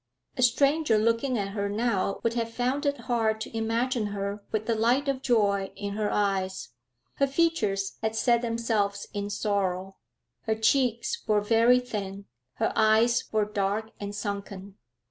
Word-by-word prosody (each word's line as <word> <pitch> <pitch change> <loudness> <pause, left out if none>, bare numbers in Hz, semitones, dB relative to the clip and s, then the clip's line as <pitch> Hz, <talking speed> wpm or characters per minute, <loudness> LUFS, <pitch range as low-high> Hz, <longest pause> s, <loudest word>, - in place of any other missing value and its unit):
A 260 - -2
stranger 275 +1 +3
looking 230 +4 +1
at 200 -2 -2
her 200 0 -2
now 205 -2 0
would 230 - +1
have 230 -1 -2
found 255 +5 -1
it 285 -3 -1
hard 225 -2 0
to 225 - -6
imagine 230 +1 0
her 200 0 -4
with 215 0 -1
the 230 - +1
light 240 +6 +2
of 270 -1 -1
joy 200 -6 +1
in 200 0 -4
her 210 0 -1
eyes; 190 -2 -1 0.5
her 275 - +3
features 245 -11 0
had 220 0 -1
set 235 +1 +3
themselves 225 -4 -1
in 205 -1 -3
sorrow. 195 -2 -1 0.5
Her 220 - +2
cheeks 235 +1 +1
were 210 -1 +3
very 230 +4 +4
thin; 200 -5 -5 0.3
her - - 0
eyes 220 +2 +3
were 215 -1 +2
dark 210 +1 -2
and 205 0 -5
sunken. 200 -1 -5
220 Hz, 160 wpm, -27 LUFS, 200-235 Hz, 0.5 s, very